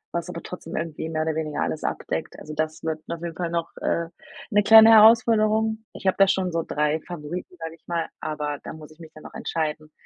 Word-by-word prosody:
was 170 Hz, -, -3 dB
aber 170 Hz, -, -7 dB
trotzdem 180 Hz, -2 st, -8 dB
irgendwie 160 Hz, -1 st, -4 dB
mehr 155 Hz, -1 st, -1 dB
oder 160 Hz, -, -1 dB
weniger 155 Hz, -1 st, -3 dB
alles 155 Hz, -, -2 dB
abdeckt.“ -, -, -4 dB
Also, 155 Hz, -, -9 dB
das 155 Hz, +1 st, -3 dB
wird 160 Hz, -1 st, -3 dB
auf 170 Hz, -1 st, -5 dB
jeden 170 Hz, -1 st, -5 dB
Fall 175 Hz, -1 st, -3 dB
noch, 170 Hz, -1 st, -2 dB
äh, 170 Hz, 0 st, 0 dB, 0.4 s
'ne 205 Hz, 0 st, +4 dB
kleine 220 Hz, +1 st, +9 dB
Herausforderung. 220 Hz, 0 st, +5 dB
Ich -, -, -6 dB
habe 185 Hz, -, +2 dB
da 195 Hz, -, +7 dB
schon 190 Hz, -1 st, 0 dB
so 165 Hz, 0 st, -1 dB
3 150 Hz, +1 st, 0 dB
Favoriten, 175 Hz, +2 st, -7 dB
sage 165 Hz, 0 st, -6 dB
ich 165 Hz, -, -32 dB
mal, 170 Hz, -1 st, -2 dB
aber 150 Hz, -2 st, -3 dB
da -, -, -7 dB
muss 155 Hz, -1 st, -12 dB
ich 155 Hz, -, -19 dB
mich 160 Hz, -1 st, -12 dB
dann 155 Hz, -, -14 dB
noch -, -, -11 dB
entscheiden. 155 Hz, -1 st, -3 dB
165 Hz, 225 wpm, -24 LUFS, 155-190 Hz, 0.4 s, kleine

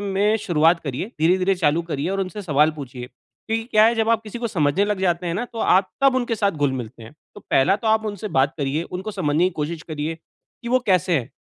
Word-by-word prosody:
में 205 Hz, +2 st, +1 dB
शुरुआत 165 Hz, 0 st, +3 dB
करिए 140 Hz, +6 st, -3 dB
धीरे-धीरे 185 Hz, +4 st, +3 dB
चालू 170 Hz, -2 st, +1 dB
करिए 145 Hz, +3 st, -2 dB
और 195 Hz, 0 st, -1 dB
उनसे 190 Hz, +2 st, -4 dB
सवाल 150 Hz, -3 st, +3 dB
पूछिए। 130 Hz, -4 st, -7 dB
क्योंकि 225 Hz, -, -6 dB
क्या 215 Hz, 0 st, +5 dB
है 230 Hz, -, +4 dB
जब 225 Hz, -1 st, 0 dB
आप 225 Hz, -1 st, +2 dB
किसी 215 Hz, +2 st, -8 dB
को 235 Hz, -, -2 dB
समझने 165 Hz, +2 st, +1 dB
लग 205 Hz, -2 st, -2 dB
जाते 175 Hz, -1 st, 0 dB
हैं 170 Hz, -, -2 dB
ना, 240 Hz, -, -2 dB
तो 235 Hz, -2 st, -10 dB
आप 190 Hz, -2 st, +3 dB
तब 275 Hz, -1 st, +4 dB
उनके 240 Hz, -2 st, 0 dB
साथ 200 Hz, -2 st, +1 dB
घुल-मिलते 130 Hz, -6 st, -3 dB
हैं। 110 Hz, -, -12 dB, 0.2 s
तो 205 Hz, -, -11 dB
पहला 175 Hz, +9 st, +4 dB
तो 225 Hz, -, -7 dB
आप 220 Hz, 0 st, +2 dB
उनसे 210 Hz, 0 st, -5 dB
बात 140 Hz, +3 st, +2 dB
करिए 145 Hz, +3 st, -1 dB
उनको 185 Hz, +5 st, -6 dB
समझने 170 Hz, -4 st, 0 dB
की 185 Hz, -, +2 dB
कोशिश 160 Hz, +2 st, -4 dB
करिए 155 Hz, -1 st, -4 dB, 0.5 s
कि 235 Hz, -, -5 dB
वो 255 Hz, +1 st, +3 dB
कैसे 180 Hz, -3 st, +3 dB
हैं? 120 Hz, -, -7 dB
180 Hz, 235 wpm, -22 LUFS, 150-210 Hz, 0.5 s, क्या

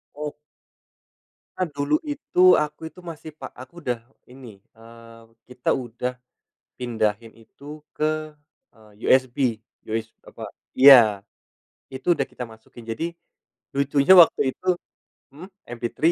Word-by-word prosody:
Oh. 150 Hz, 0 st, -5 dB, 1.2 s
Karena 185 Hz, -2 st, -1 dB
dulu 145 Hz, +1 st, 0 dB
itu 275 Hz, -11 st, +3 dB
aku 150 Hz, +1 st, -3 dB
itu -, -, -17 dB
masih 160 Hz, -2 st, -8 dB
pak -, -, -9 dB
aku 130 Hz, +7 st, -13 dB
udah 125 Hz, -8 st, -3 dB, 0.2 s
ini, 125 Hz, -5 st, -13 dB, 0.2 s
eee, 115 Hz, 0 st, -15 dB, 0.2 s
kita 125 Hz, 0 st, -4 dB
udah 125 Hz, 0 st, -2 dB, 0.6 s
pindahin 115 Hz, -2 st, -2 dB
itu 145 Hz, +6 st, -13 dB
ke, 155 Hz, 0 st, -2 dB, 0.4 s
eee, 110 Hz, -2 st, -21 dB, 0.2 s
USB 130 Hz, -2 st, +2 dB, 0.3 s
us 115 Hz, 0 st, -2 dB, 0.2 s
apa -, -, -9 dB, 0.2 s
iya, 125 Hz, -7 st, +8 dB, 0.7 s
itu 130 Hz, +6 st, -2 dB
udah 145 Hz, -5 st, +1 dB
kita 125 Hz, -, -8 dB
masukin 115 Hz, 0 st, -13 dB
jadi 160 Hz, +10 st, -4 dB, 0.6 s
lucunya 140 Hz, +4 st, +4 dB
waktu 150 Hz, -5 st, +5 dB
itu 185 Hz, -, -14 dB, 0.7 s
mhm, 170 Hz, +6 st, -11 dB, 0.2 s
MP3 120 Hz, 0 st, -6 dB
130 Hz, 120 wpm, -23 LUFS, 115-150 Hz, 1.2 s, iya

